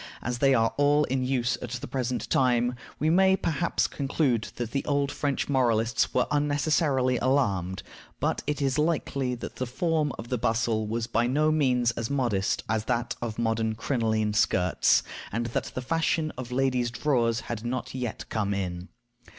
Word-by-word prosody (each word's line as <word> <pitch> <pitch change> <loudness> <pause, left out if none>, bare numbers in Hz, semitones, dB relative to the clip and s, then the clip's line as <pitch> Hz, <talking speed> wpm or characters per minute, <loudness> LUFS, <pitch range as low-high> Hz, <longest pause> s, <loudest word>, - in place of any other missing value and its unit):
As 120 0 -2
they 135 0 +4
are 115 -1 +2
all 145 +1 +4
in 130 -1 -1
use 125 -1 0
at 125 - -5
the 125 - -4
present 125 0 -2
time, 125 -1 +3 0.2
we 155 +2 +1
may 190 +2 +5
perhaps 170 0 0
conclude 135 -5 0
that 120 -2 -4
the 135 - -1
old 140 -1 +1
French 140 -2 -1
moralists 115 -4 +2
were 125 - +2
unnecessarily 145 -3 +2
alarmed; 100 -9 0 0.4
but - - 0
it 150 -1 -1
is 135 +1 +1
likely 140 -5 0
that 120 - -8
the 130 - -2
form 155 +3 0
of 115 - -8
the 125 - -1
bustle 115 -1 0
was 115 +1 -2
by 120 0 +1
no 150 +4 +2
means 125 -6 +2
as 115 -1 -4
modest 120 -9 0
as 110 0 -1
that 120 0 -1
of 115 -3 -4
modern 110 -1 0
crinoline 110 -3 0
skirts, 90 -3 +3 0.3
and 115 +2 -1
that - - 0
the 130 - -3
fashion 160 +1 0
of 125 -1 -7
ladies' 125 -2 +1
drawers 120 -3 +1
had 115 -2 -5
not 125 +1 -3
yet 125 -3 -4
come 100 -2 -1
in. 90 -1 -4
125 Hz, 175 wpm, -27 LUFS, 115-140 Hz, 0.4 s, may